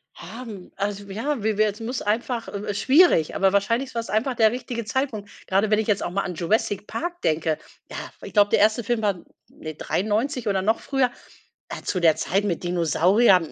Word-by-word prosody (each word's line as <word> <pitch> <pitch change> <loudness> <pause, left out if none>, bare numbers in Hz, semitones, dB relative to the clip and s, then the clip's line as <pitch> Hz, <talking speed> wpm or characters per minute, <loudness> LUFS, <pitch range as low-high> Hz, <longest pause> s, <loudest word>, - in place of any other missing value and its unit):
Haben 220 -5 -9
also, 200 0 -3
ja, 230 +4 -2
wie 215 -1 0
wer 215 0 +4
es 210 - -14
muss 235 +2 -4
einfach 230 +3 -1
äh, - - -7
äh, 205 0 -4
schwierig, 265 - +4
aber 195 0 +3
wahrscheinlich 230 +6 +1
war‘s 230 0 -3
einfach 230 +5 0
der 220 -1 +4
richtige 245 -1 -4
Zeitpunkt. 225 -3 -2 0.2
Grade 195 +3 +2
wenn 215 0 +3
ich 220 - -1
jetzt 205 -2 +1
auch - - -2
mal 195 +2 -1
an 180 -2 -5
„Jurassic 205 +3 0
Park“ 345 +9 -4
denke. 155 0 +1 0.3
Ja, - - -7 0.3
ich - - -9
glaube, 205 -1 +5
der - - +3
1. 220 +3 +3
Film 235 +1 -1
war 205 -2 +1 0.3
ne, 155 -1 -8
93 220 - -1
oder 195 -2 +1
noch 220 +4 +1
früher, 270 -3 +1 0.6
äh, - - -6
zu 185 - -1
der 165 -3 +5
Zeit 195 +4 0
mit 180 -3 -2
Dinosauriern. 180 +3 +3
210 Hz, 205 wpm, -24 LUFS, 195-235 Hz, 0.6 s, glaube